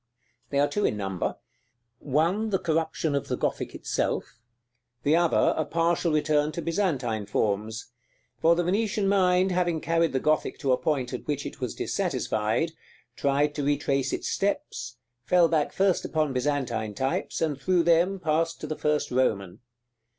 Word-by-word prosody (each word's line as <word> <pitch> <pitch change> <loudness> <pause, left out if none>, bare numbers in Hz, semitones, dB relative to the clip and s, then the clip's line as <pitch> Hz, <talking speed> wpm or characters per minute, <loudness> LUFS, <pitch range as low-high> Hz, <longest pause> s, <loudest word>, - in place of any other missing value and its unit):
They 140 - -1
are 145 +1 +4
two 205 +8 -2
in 105 - +1
number: 95 -3 -3 0.6
one 170 +10 +1
the 195 - +2
corruption 160 -3 -1
of 140 - -1
the - - -2
Gothic - - -2
itself; 115 - -2 0.6
the 150 +3 +4
other 170 -1 +3
a 155 - 0
partial 165 +1 +1
return 150 0 +2
to 170 - -4
Byzantine 135 - -1
forms; 110 +3 -2 0.5
for 165 +1 +5
the 175 - +1
Venetian 200 +2 0
mind 185 -1 +3
having 175 -2 +1
carried 165 0 +1
the 130 - 0
Gothic 155 +3 0
to 135 -3 0
a 125 - +4
point 135 -5 -1
at 125 - -6
which 145 -2 -2
it - - -8
was 125 - -3
dissatisfied, 110 +10 -1 0.4
tried 145 +1 +1
to 145 - -3
retrace 140 -2 0
its - - -3
steps, 160 - -2 0.3
fell 175 +4 +4
back 155 -2 +1
first 190 -2 +2
upon 155 -4 0
Byzantine 125 -5 -1
types, 135 +5 -2
and 150 -4 -1
through 180 +2 +2
them 175 +3 +3
passed 165 -1 0
to - - -4
the 155 +1 -3
first 150 0 0
Roman. 100 -8 0
155 Hz, 165 wpm, -27 LUFS, 130-170 Hz, 0.6 s, for